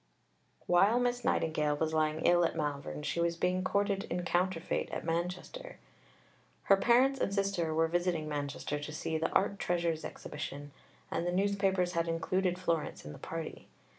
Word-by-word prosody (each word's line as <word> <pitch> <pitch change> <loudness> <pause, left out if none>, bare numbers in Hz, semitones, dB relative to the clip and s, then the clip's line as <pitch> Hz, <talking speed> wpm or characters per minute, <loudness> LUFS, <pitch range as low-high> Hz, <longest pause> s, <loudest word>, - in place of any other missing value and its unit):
While 195 +7 +4
Miss 245 -1 0
Nightingale 150 -2 +1
was 160 +1 -1
lying 155 0 +1
ill 175 0 +5
at 165 - +1
Malvern, 150 -1 -3
she 150 - -2
was 170 0 +1
being 185 +1 +1
courted 200 +1 0
in 175 +1 -3
counterfeit 175 0 0
at - - -5
Manchester. 180 - -3 0.9
Her 195 - +5
parents 255 +6 +4
and - - 0
sister 195 -5 0
were 160 +1 +2
visiting 175 -2 0
Manchester 145 0 -3
to 150 +1 -6
see 160 +1 -2
the 160 - 0
"Art 200 +1 +1
Treasures 170 -2 0
Exhibition," 145 -1 -6 0.4
and 170 - -1
the - - +1
newspapers 195 -1 +1
had 170 -1 0
included 180 +2 0
Florence 170 -4 -2
in 75 - -6
the - - -11
party. 165 -1 -6
175 Hz, 165 wpm, -32 LUFS, 160-190 Hz, 0.9 s, ill